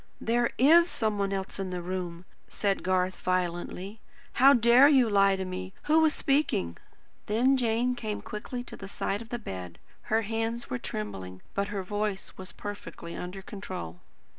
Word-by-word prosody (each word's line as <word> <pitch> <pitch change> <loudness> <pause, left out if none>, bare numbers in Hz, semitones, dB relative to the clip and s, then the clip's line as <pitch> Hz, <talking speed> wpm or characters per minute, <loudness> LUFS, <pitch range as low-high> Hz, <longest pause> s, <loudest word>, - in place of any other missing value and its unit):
"There 235 +1 +1
IS 335 +6 +6
some 215 -7 -1
one 200 0 0
else 195 0 -3
in 190 -1 -2
the 180 -1 -3
room!" 180 -1 -4 0.2
said 200 -2 -1
Garth 185 0 +1
violently. 185 +3 -2 0.3
"How 270 +2 +7
dare 240 +3 +7
you 265 -5 +5
lie 195 -2 +4
to 190 0 -3
me! 185 0 -5
Who 310 +2 +4
was 320 -1 +5
speaking?" 275 - +1 0.5
Then 245 +6 +3
Jane 240 0 +1
came 220 -4 -4
quickly 245 +4 -5
to - - -8
the 195 - -8
side 200 +1 -2
of 230 - -10
the 240 - -2
bed. 90 - -7 0.3
Her 225 +1 +3
hands 225 +2 -2
were 125 - -1
trembling, 95 -3 -6
but 200 0 0
her 205 -2 -3
voice 205 0 -3
was 185 -1 -8
perfectly 205 -4 -7
under 185 +2 -6
control. 90 - -7
200 Hz, 170 wpm, -28 LUFS, 185-235 Hz, 0.5 s, How